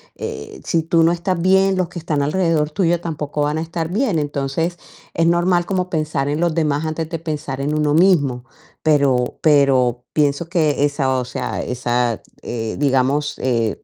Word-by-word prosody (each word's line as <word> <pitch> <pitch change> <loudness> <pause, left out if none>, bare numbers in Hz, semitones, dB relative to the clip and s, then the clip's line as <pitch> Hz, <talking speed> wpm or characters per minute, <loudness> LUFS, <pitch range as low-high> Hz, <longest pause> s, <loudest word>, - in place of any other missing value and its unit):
eh, - - -7
si 165 -2 +1
tú 165 0 +3
no 165 - +4
estás 175 +1 -1
bien, 190 +1 +4
los 180 -3 0
que 175 - -7
están 155 -3 -1
alrededor 155 0 +1
tuyo 175 -1 +1
tampoco 150 -3 -3
van 150 +1 0
a - - -1
estar 165 0 -4
bien. 210 -3 0
Entonces, 145 +4 -2 0.4
es 165 - +2
normal 175 +1 +2
como 185 -2 -1
pensar 155 -4 -1
en 150 - -1
los 170 -1 +1
demás 150 -2 0
antes 160 0 -3
de 165 - -4
pensar 150 -4 -4
en 145 +2 -1
uno 150 -1 +1
mismo. 145 -8 +3 0.4
Pero, 140 -5 +2
pero 130 -5 +3
pienso 150 +2 +1
que 155 -5 +2
esa, 135 -3 0
o 125 - -3
sea, 125 - -4
esa, 120 -2 -1 0.2
eh, 115 -2 -4
digamos, 145 +1 +1
eh, 115 -4 -1
150 Hz, 180 wpm, -19 LUFS, 140-170 Hz, 0.4 s, no